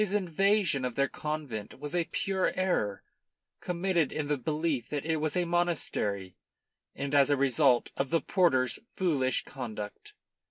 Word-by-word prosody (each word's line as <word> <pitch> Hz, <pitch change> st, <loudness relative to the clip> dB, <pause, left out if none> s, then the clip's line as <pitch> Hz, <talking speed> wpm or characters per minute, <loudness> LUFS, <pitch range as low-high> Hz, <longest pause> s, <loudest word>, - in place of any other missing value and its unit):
His 205 Hz, -1 st, +1 dB
invasion 195 Hz, -4 st, +2 dB
of 125 Hz, -2 st, -2 dB
their 140 Hz, 0 st, +2 dB
convent 145 Hz, -9 st, -5 dB
was 145 Hz, +4 st, -5 dB
a 175 Hz, -1 st, +2 dB
pure 190 Hz, +2 st, 0 dB
error, 145 Hz, -, 0 dB, 0.6 s
committed 175 Hz, -3 st, 0 dB
in 150 Hz, -2 st, -3 dB
the 145 Hz, -, +2 dB
belief 150 Hz, -2 st, -1 dB
that 145 Hz, -1 st, -3 dB
it 160 Hz, 0 st, +1 dB
was 155 Hz, +2 st, -1 dB
a 180 Hz, -, +2 dB
monastery 150 Hz, -, -1 dB, 0.6 s
and 140 Hz, 0 st, -4 dB
as 140 Hz, -1 st, +5 dB
a 145 Hz, -, +3 dB
result 135 Hz, -2 st, +3 dB
of 135 Hz, -1 st, -1 dB
the 165 Hz, -, +3 dB
porter's 130 Hz, -12 st, +2 dB, 0.2 s
foolish 140 Hz, -9 st, +1 dB
conduct. 110 Hz, -6 st, -7 dB
150 Hz, 155 wpm, -30 LUFS, 130-175 Hz, 0.6 s, as